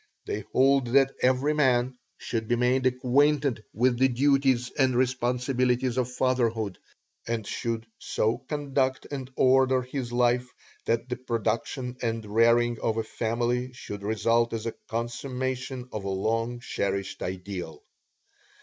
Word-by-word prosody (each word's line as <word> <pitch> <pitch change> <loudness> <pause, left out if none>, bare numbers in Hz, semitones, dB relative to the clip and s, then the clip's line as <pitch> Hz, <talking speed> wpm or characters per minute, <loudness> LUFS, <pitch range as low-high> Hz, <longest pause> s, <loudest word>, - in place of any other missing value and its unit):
They 415 -1 -2
hold 135 -1 +4
that 135 0 +5
every 130 +4 +3
man 130 -4 +2 0.2
should 115 -2 -3
be 120 - +2
made 125 +2 +2
acquainted 130 0 +2
with 120 +1 +1
the 130 - +6
duties 130 -1 +2
and 130 -2 +2
responsibilities 125 0 +1
of 125 -1 -1
fatherhood, 115 -6 0 0.5
and 115 -2 -2
should 115 +1 -3
so 115 +2 0
conduct 135 -1 -1
and 135 -3 -5
order 130 0 +4
his 125 -1 -5
life 125 +1 +2 0.4
that 115 +1 0
the 125 -1 -3
production 125 +1 -2
and 115 -2 -2
rearing 115 +2 +3
of 115 0 0
a 115 - 0
family 120 +3 -1
should 105 -5 -7
result 115 +3 +1
as 115 -1 -3
a 115 - -2
consummation 125 +2 -3
of 105 - -5
a 100 - -3
long 115 +5 -1
cherished 100 -4 -3
ideal. 90 -2 -5
125 Hz, 135 wpm, -27 LUFS, 115-130 Hz, 0.5 s, the